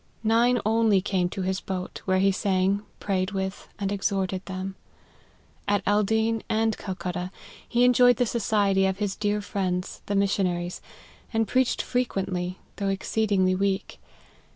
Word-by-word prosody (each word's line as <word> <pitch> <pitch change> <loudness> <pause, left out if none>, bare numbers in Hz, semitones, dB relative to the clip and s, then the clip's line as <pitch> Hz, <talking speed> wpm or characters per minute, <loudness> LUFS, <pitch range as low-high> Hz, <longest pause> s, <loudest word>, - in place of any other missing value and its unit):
Nine 235 +3 +4
only 220 -2 +4
came 185 -2 0
to 190 - -4
his 190 +1 -1
boat, 185 -1 -5
where 185 -1 +2
he 195 +1 +4
sang, 195 0 +1 0.2
pray 195 -2 0
ed 185 +2 -3
with, 190 0 -3
and 200 -1 -2
exhorted 195 -2 -1
them. 190 0 -4 0.9
At 205 -1 +1
Aldeen 220 +2 +2
and 220 0 +1
Cal 190 -2 -5
cutta, 180 0 -4 0.4
he 240 0 +3
enjoyed 245 0 +6
the 250 - +1
society 205 -4 +2
of 190 0 -1
his 205 -2 -2
dear 210 0 0
friends, 185 -3 -2
the 205 - -1
missionaries, 185 -3 0 0.5
and 225 -1 +1
preached 255 +3 +1
frequently, 190 -7 -2 0.2
though 200 -1 -1
exceedingly 195 -1 +1
weak. 195 +1 -1
195 Hz, 150 wpm, -26 LUFS, 190-220 Hz, 0.9 s, enjoyed